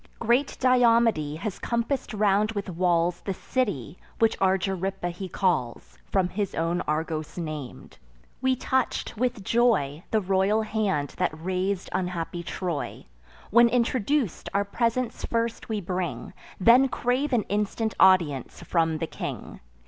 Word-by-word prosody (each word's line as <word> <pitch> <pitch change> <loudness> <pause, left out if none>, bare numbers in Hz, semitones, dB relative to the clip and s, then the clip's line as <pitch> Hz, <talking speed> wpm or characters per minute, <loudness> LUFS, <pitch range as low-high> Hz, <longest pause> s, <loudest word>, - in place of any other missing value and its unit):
Great 240 +5 +1
Diomede 230 - +3
has 205 0 -4
compass'd 235 +3 -1
round 210 +1 +2
with 200 -3 -4
walls 175 0 +1
The 195 - -3
city, 185 - -2 0.2
which 225 -1 +3
Argyripa 190 -1 0
he 185 +2 -7
calls, 170 -11 -1
From 190 -2 +2
his 200 -1 -3
own 165 +2 0
Argos 155 +1 -2
nam'd. 155 -6 -7 0.4
We 260 0 +2
touch'd, 260 0 -1
with 245 -2 -1
joy, 190 - +2
The 220 - +2
royal 195 +2 +2
hand 205 -10 -1
that 180 -4 -1
raz'd 185 +2 -2
unhappy 180 -2 -2
Troy. 170 -3 -4 0.5
When 235 +2 +6
introduc'd, 245 - 0
our 200 0 +2
presents 235 +3 -1
first 230 0 -2
we 215 -1 -1
bring, 180 -2 -4 0.3
Then 240 +7 +6
crave 255 +3 -1
an 235 -4 +2
instant 210 +2 -1
audience 170 -9 +3
from 165 -2 +1
the 165 - -2
king. - - -6
195 Hz, 135 wpm, -26 LUFS, 175-230 Hz, 0.5 s, When